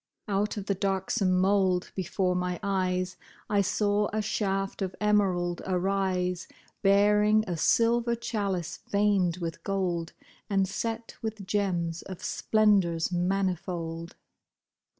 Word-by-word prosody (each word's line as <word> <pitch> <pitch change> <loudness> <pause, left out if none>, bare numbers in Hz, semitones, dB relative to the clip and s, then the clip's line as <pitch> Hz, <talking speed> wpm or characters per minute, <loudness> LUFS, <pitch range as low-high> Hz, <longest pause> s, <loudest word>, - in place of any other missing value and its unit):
Out 205 +1 0
of 200 - -4
the 200 - +1
darksome 190 0 +1
mould, 190 -1 +2
before 185 0 0
my 180 0 -2
eyes 185 -2 0 0.3
I 205 -1 +4
saw 205 +1 +1
a 215 - -1
shaft 195 -2 -1
of 190 -1 -2
emerald 190 -5 +1
arise. 185 -1 0 0.3
Bearing 210 +2 +4
a 175 - -2
silver 235 +6 +3
chalice 200 -7 -3
veined 200 -4 +2
with 165 -2 -5
gold. 180 -4 -1 0.4
And 195 -2 +2
set 225 +3 -4
with 220 -3 -4
gems 180 -4 -1
of 185 -2 -9
splendors 195 -7 +2
manifold. 175 -2 -2
195 Hz, 115 wpm, -28 LUFS, 180-205 Hz, 0.4 s, I